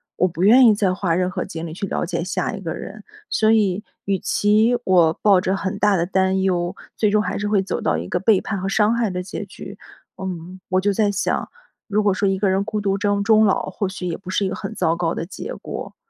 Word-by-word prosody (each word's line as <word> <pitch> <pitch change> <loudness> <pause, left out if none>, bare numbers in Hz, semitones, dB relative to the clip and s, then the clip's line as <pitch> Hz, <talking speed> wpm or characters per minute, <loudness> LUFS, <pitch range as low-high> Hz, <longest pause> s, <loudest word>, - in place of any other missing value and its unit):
我 185 - +2
不 175 -1 -6
愿 245 +6 +7
意 225 - +7
再 200 -3 +1
花 185 -3 0
任 180 +1 +1
何 185 - -3
精 165 +1 -6
力 155 - -7
去 195 - -3
了 - - -2
解 170 -1 -3
下 185 +6 -2
一 200 - -5
个 165 -4 -4
人。 210 +4 -9 0.3
所 220 0 +3
以 210 -3 +2 0.2
与 195 -1 0
其 215 +6 +2
我 175 -5 +4
抱 200 -3 +5
着 190 +1 0
很 190 -1 -3
大 210 -1 +3
的 170 -2 +1
担 190 +1 +1
忧， 180 -2 0 0.2
最 215 - +2
终 210 +1 +3
还 - - -3
是 205 - -2
会 205 -2 +2
走 190 - -3
到 85 - +1
一 85 +2 -5
个 - - 0
背 205 -1 +3
叛 200 -3 -3
和 190 - -3
伤 210 +2 +3
害 235 -2 0
的 180 -1 -4
结 195 +2 -6
局。 195 +1 -10 0.4
嗯， 185 0 -6
我 185 0 +2
就 205 +1 +2
在 210 +1 +2
想， 205 +1 -1 0.4
如 210 0 +1
果 205 -2 +3
说 200 +2 0
一 195 0 +1
个 195 0 +1
人 190 +1 +1
孤 215 -1 -3
独 195 -1 0
征 205 0 0
终 220 0 +5
老 195 - +2
或 190 +1 -3
许 190 -1 -6
也 170 - -3
不 185 - -12
是 195 +2 0
一 190 - -1
个 - - -4
很 220 - -6
糟 165 -5 +1
糕 170 -1 0
的 - - -4
结 410 - -7
果， - - -7
195 Hz, 280 characters per minute, -21 LUFS, 185-210 Hz, 0.4 s, 愿